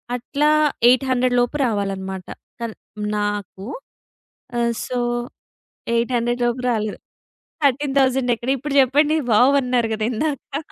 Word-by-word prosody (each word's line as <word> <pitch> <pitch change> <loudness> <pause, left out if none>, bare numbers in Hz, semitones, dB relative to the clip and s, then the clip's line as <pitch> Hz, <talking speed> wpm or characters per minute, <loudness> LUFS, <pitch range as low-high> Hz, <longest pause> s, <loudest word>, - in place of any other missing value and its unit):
అట్లా 280 +4 -1 0.4
800 255 -1 +3
లోపు 245 +4 0
రావాలన్నమాట. 195 -4 -3 0.3
కన్ 230 -2 -5 0.4
నాకు. 205 -2 -3 0.9
ఆహ్, 235 0 +1
సో, 250 - -3 1.0
800 240 +1 0
లోపు 240 +1 -1
రాలేదు. 215 -2 -1 0.7
13,000 270 -2 +2
ఎక్కడ 235 +3 -4
ఇప్పుడు 285 +2 -4
జెప్పండి 290 +4 +3 0.2
వావ్! 250 +6 +5
అన్నారు 245 -2 +1
గదా 215 0 -1
ఇందాక. 285 +2 -3
245 Hz, 105 wpm, -21 LUFS, 220-265 Hz, 1.0 s, వావ్